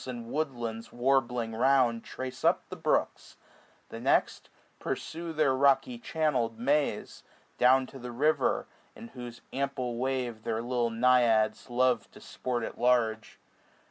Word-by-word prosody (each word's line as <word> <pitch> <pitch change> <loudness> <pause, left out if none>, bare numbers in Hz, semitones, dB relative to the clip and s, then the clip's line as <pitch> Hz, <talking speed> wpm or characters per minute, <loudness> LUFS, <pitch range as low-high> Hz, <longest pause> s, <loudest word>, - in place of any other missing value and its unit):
And 120 -2 -6
woodlands 120 -7 -3
warbling 120 -2 0
round, 120 -1 +2
trace 130 -1 -7
up - - +2
the - - -6
brooks; - - -1 0.5
The - - -7
next, - - +1 0.3
pursue 165 +1 -4
their 150 -4 +2
rocky 140 - +2
channel'd 145 - -1
maze, 140 +5 -1 0.4
Down 130 +1 +5
to 135 - -12
the 125 0 -7
river, 150 +6 +1 0.3
in 115 - -10
whose 120 -2 -9
ample 130 -3 -2
wave 125 -3 -2
Their 110 +1 -2
little 120 -1 0
naiads 115 -2 +2
love 125 0 +1
to - - -13
sport 120 -2 -4
at - - -6
large. 115 -3 +1
125 Hz, 135 wpm, -29 LUFS, 115-135 Hz, 0.5 s, Down